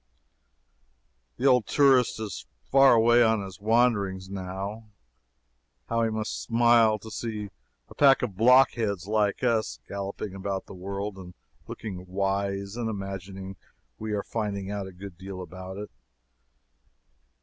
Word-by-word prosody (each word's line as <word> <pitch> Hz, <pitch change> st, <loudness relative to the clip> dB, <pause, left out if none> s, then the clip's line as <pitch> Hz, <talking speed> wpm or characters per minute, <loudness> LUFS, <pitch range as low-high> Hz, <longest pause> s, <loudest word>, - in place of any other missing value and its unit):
The 125 Hz, -, -3 dB
old 125 Hz, -5 st, +4 dB
tourist 135 Hz, -5 st, +4 dB
is 110 Hz, -3 st, -6 dB, 0.2 s
far 135 Hz, -1 st, +7 dB
away 120 Hz, +1 st, +5 dB
on 110 Hz, -3 st, +3 dB
his 95 Hz, -2 st, -9 dB
wanderings, 100 Hz, -4 st, +1 dB
now. 100 Hz, +3 st, -5 dB, 1.0 s
How 115 Hz, 0 st, +1 dB
he 115 Hz, -, +2 dB
must 110 Hz, 0 st, -3 dB
smile 115 Hz, -2 st, +4 dB
to 110 Hz, +1 st, -11 dB
see 105 Hz, -4 st, -5 dB, 0.4 s
a -, -, -13 dB
pack 135 Hz, -2 st, +5 dB
of 105 Hz, -6 st, -3 dB
blockheads 115 Hz, -4 st, +4 dB
like 105 Hz, 0 st, 0 dB
us, 115 Hz, -3 st, +1 dB
galloping 100 Hz, 0 st, -5 dB
about 95 Hz, 0 st, -4 dB
the -, -, -11 dB
world, 100 Hz, +2 st, -5 dB
and 90 Hz, -2 st, -11 dB, 0.3 s
looking 95 Hz, -4 st, -7 dB
wise, 100 Hz, +1 st, -2 dB
and 115 Hz, -2 st, -2 dB
imagining 95 Hz, -2 st, -6 dB, 0.4 s
we 110 Hz, -1 st, -4 dB
are 100 Hz, -, -1 dB
finding 100 Hz, -3 st, -3 dB
out 100 Hz, -2 st, -4 dB
a -, -, -9 dB
good 90 Hz, -1 st, -11 dB
deal 95 Hz, -1 st, -7 dB
about 95 Hz, +1 st, -8 dB
it! 105 Hz, +1 st, -7 dB
100 Hz, 140 wpm, -27 LUFS, 95-115 Hz, 1.0 s, far